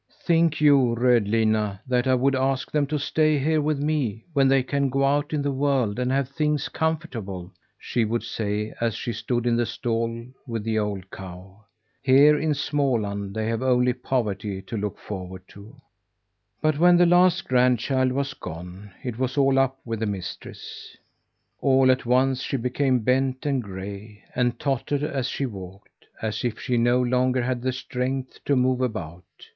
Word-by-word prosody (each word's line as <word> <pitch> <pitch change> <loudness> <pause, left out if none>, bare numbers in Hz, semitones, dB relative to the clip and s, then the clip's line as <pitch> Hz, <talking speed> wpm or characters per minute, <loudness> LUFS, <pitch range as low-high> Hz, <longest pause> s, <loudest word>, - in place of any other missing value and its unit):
"Think 165 -2 +2
you, 140 -5 +4
Rödlinna, 110 -4 +2
that 125 0 +1
I 130 - +4
would 135 +2 +2
ask 130 0 0
them 145 -2 +1
to 150 +1 -1
stay 155 +1 +2
here 155 +3 +1
with 150 0 0
me, 140 -8 -1
when 135 -2 +4
they 135 -1 +4
can 140 +1 0
go 135 +1 +1
out 145 +2 +1
in 150 -2 -1
the 140 - 0
world 130 -5 0
and 125 0 0
have 135 -1 +1
things 150 +1 -1
comfortable?" 115 - -3 0.2
she 120 - -1
would 115 +2 -1
say 105 0 -3
as 115 -2 0
she 120 - -4
stood 120 +2 -2
in 120 -1 +2
the 120 0 +1
stall 115 0 -2 0.2
with 115 -3 -3
the 110 0 0
old 100 -3 -4
cow. 95 +2 -11 0.4
"Here 140 +3 +6
in 150 +1 0
Småland 115 -9 -1
they 110 0 -1
have 115 +1 -1
only 125 -1 +3
poverty 105 -6 -2
to - - -7
look 105 -2 -3
forward 95 -2 -7
to." 105 +6 -13 0.9
But 155 -1 +2
when 175 +1 +6
the 175 - +6
last 180 +1 +4
grandchild 125 +1 +2
was 140 +1 -2
gone, 90 +5 -9
it 125 -3 -5
was 130 +1 -1
all 135 -1 +4
up 135 0 +1
with 115 -2 -3
the 110 - -1
mistress. 95 -3 -7 0.6
All 130 -1 +4
at 130 -1 -1
once 130 +1 +2
she 135 - -2
became 125 +1 +1
bent 130 +2 +1
and 140 -3 +1
gray, 100 +1 -8
and 120 -1 0
tottered 140 +1 -1
as 135 -4 -1
she 140 - -2
walked; 95 -4 -10 0.2
as 110 -1 -2
if 120 -3 -2
she 125 - -1
no 120 +1 +3
longer 125 0 +1
had 125 0 -1
the 130 +1 0
strength 130 0 -4
to 140 - +2
move 130 0 +2
about. 90 -8 -4
125 Hz, 175 wpm, -24 LUFS, 110-140 Hz, 0.9 s, Here